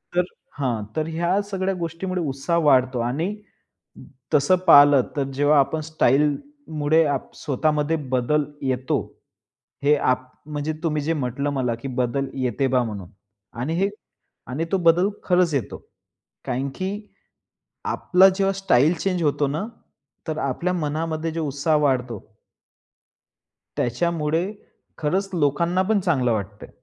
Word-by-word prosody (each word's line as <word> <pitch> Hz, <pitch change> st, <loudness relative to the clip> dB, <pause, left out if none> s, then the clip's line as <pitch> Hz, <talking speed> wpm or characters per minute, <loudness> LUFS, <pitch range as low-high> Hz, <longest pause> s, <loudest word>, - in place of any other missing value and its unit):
तर 180 Hz, -, +4 dB, 0.4 s
हां, 120 Hz, -6 st, -1 dB
तर 155 Hz, 0 st, -1 dB
ह्या 170 Hz, +4 st, 0 dB
सगळ्या 195 Hz, 0 st, -1 dB
गोष्टीमुळे 170 Hz, +2 st, -3 dB
उत्साह 140 Hz, +5 st, 0 dB
वाढतो. 130 Hz, -3 st, +4 dB
आणि 155 Hz, -, -1 dB, 1.0 s
तसं 150 Hz, +6 st, +4 dB
पहिल 145 Hz, -2 st, +9 dB, 0.2 s
तर 140 Hz, -, +1 dB
जेव्हा 145 Hz, +1 st, +4 dB
आपण 155 Hz, +3 st, 0 dB
स्टाईलमुळे 155 Hz, -, +1 dB
आप 140 Hz, -2 st, -2 dB
स्वतःमध्ये 150 Hz, +3 st, 0 dB, 0.2 s
बदल 150 Hz, +5 st, +1 dB, 0.2 s
येतो. 130 Hz, -1 st, 0 dB, 0.8 s
हे 150 Hz, +1 st, +5 dB
आप 130 Hz, -2 st, 0 dB, 0.2 s
म्हणजे 150 Hz, +1 st, -3 dB
तुम्ही 155 Hz, -2 st, 0 dB
जे 160 Hz, +3 st, 0 dB
म्हटलं 140 Hz, -1 st, -2 dB
मला, 125 Hz, -4 st, 0 dB
की 120 Hz, +4 st, -8 dB
बदल 130 Hz, +2 st, -1 dB
येते 125 Hz, +2 st, 0 dB
बा 125 Hz, -1 st, +2 dB
म्हणून 100 Hz, -6 st, -6 dB, 0.5 s
आणि 145 Hz, +6 st, -2 dB
हे 195 Hz, +3 st, +1 dB, 0.6 s
आणि 150 Hz, +6 st, -2 dB
तो 195 Hz, -, +3 dB
बदल 175 Hz, +2 st, +4 dB
खरंच 180 Hz, -3 st, +2 dB
येतो. 130 Hz, -7 st, -3 dB, 0.7 s
कारण 130 Hz, +2 st, -2 dB
की 185 Hz, 0 st, -2 dB, 1.0 s
आपला 185 Hz, +2 st, +4 dB
जेव्हा 195 Hz, -1 st, +2 dB
स्टाईल 175 Hz, -5 st, +3 dB
चेंज 180 Hz, 0 st, -1 dB
होतो 145 Hz, -1 st, +1 dB
ना, 155 Hz, +9 st, -2 dB, 0.6 s
तर 155 Hz, -1 st, -2 dB
आपल्या 155 Hz, +6 st, -1 dB
मनामध्ये 160 Hz, 0 st, -2 dB
जो 165 Hz, 0 st, -2 dB
उत्साह 145 Hz, +3 st, +1 dB
वाढतो 130 Hz, -5 st, 0 dB, 1.6 s
त्याच्यामुळे 160 Hz, +5 st, 0 dB, 0.6 s
खरचं 185 Hz, +4 st, -1 dB
लोकांना 170 Hz, +5 st, +2 dB
पण 205 Hz, +2 st, +1 dB
चांगलं 135 Hz, -10 st, +1 dB
वाटतंय. 100 Hz, -1 st, -5 dB
150 Hz, 130 wpm, -23 LUFS, 135-170 Hz, 1.6 s, पहिल